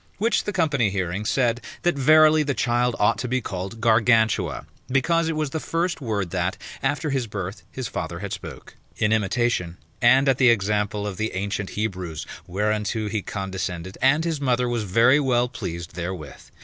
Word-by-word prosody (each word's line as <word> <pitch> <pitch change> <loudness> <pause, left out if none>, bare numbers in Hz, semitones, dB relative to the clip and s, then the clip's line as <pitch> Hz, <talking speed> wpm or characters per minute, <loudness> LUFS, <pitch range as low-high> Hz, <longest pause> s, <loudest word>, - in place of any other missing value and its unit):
Which 220 +2 +1
the 205 - -1
company 150 - +1
hearing, 95 +1 -2
said 120 0 +1 0.2
that 175 - +3
verily 155 +3 +6
the 140 -3 -1
child 120 +1 +1
ought 105 +3 +2
to 125 - -2
be 130 +1 0
called 95 0 -5
Gargantua; 110 -1 +2 0.2
because 165 +5 +2
it 165 - -1
was 155 -2 -1
the 160 - -2
first 170 +1 -2
word 100 -8 -2
that 95 +1 -1 0.2
after 145 +2 -1
his 130 -4 -1
birth 100 -1 -5
his 130 -2 -4
father 85 -3 -4
had 100 +2 -5
spoke, - - -9 0.2
in 105 0 +2
imitation, 105 -4 0 0.2
and 130 +3 +5
at 135 -2 +3
the 130 -2 +6
example 105 -1 +1
of 100 -3 -4
the 110 -2 -2
ancient 100 +1 -2
Hebrews; 90 -7 -3 0.2
whereunto 105 +3 -1
he 110 0 -1
condescended, 95 -2 -4
and 145 +5 +3
his 160 -4 -2
mother 125 -2 +1
was 120 -3 -1
very 115 +9 +4
well 125 -3 +2
pleased 85 -8 -6
therewith. 85 -3 -6
115 Hz, 175 wpm, -24 LUFS, 100-135 Hz, 0.2 s, verily